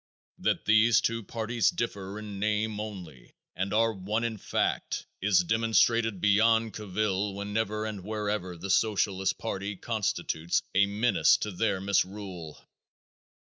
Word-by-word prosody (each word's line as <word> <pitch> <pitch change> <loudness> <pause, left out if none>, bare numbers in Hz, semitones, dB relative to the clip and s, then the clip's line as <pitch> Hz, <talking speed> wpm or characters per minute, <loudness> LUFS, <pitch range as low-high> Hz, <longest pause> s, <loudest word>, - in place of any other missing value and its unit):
That - - 0
these 110 +2 +5
two 115 0 -1
parties 115 -1 0
differ 100 -4 -4
in 105 -2 -7
name 105 0 0
only 90 - -8 0.2
and 95 +2 -2
are 115 +1 +3
one 105 +4 -2
in 115 -2 -2
fact - - -1 0.2
is 95 -2 +4
demonstrated 115 +1 +2
beyond 110 +3 +3
cavil 100 -1 -2
whenever 105 +1 -2
and 105 -4 -5
wherever 105 -4 -3
the 95 +3 -4
Socialist 95 -1 +1
party 100 -2 -4
constitutes 95 -6 -1
a 100 +1 +4
menace 105 +4 +3
to 105 - -4
their 95 +1 0
misrule. 95 -4 -2
105 Hz, 130 wpm, -28 LUFS, 95-110 Hz, 0.2 s, these